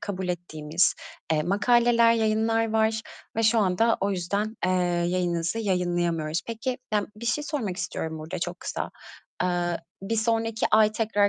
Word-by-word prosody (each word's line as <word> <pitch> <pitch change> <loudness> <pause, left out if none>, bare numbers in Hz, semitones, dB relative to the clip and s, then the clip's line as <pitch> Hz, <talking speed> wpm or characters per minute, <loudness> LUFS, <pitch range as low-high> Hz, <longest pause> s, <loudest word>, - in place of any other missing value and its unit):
kabul 190 -2 -4
ettiğimiz, 165 -1 0 0.4
eee, 155 -1 +2
makaleler, 235 +5 +4
yayınlar 225 0 +1
var 220 0 +2 0.4
ve 225 - +1
şu 225 +1 +4
anda 215 +3 +3
o 200 - +1
yüzden, 200 +4 -2
eee, 185 - +2 0.4
yayınınızı 175 +1 0
yayımlayamıyoruz. 175 -5 0
Peki, 240 +3 -3 0.2
ya 210 - +2
bir 235 +2 -7
şey 295 +6 0
sormak 235 - -3
istiyorum 160 -4 -4
burada 155 +3 -5
çok 175 +1 -4
kısa. - - -4 0.5
Eee, 175 -1 0 0.2
bir 225 +3 -1
sonraki 225 0 +1
ay 215 0 +5
tekrar 210 -2 +2
205 Hz, 150 wpm, -26 LUFS, 175-225 Hz, 0.5 s, ay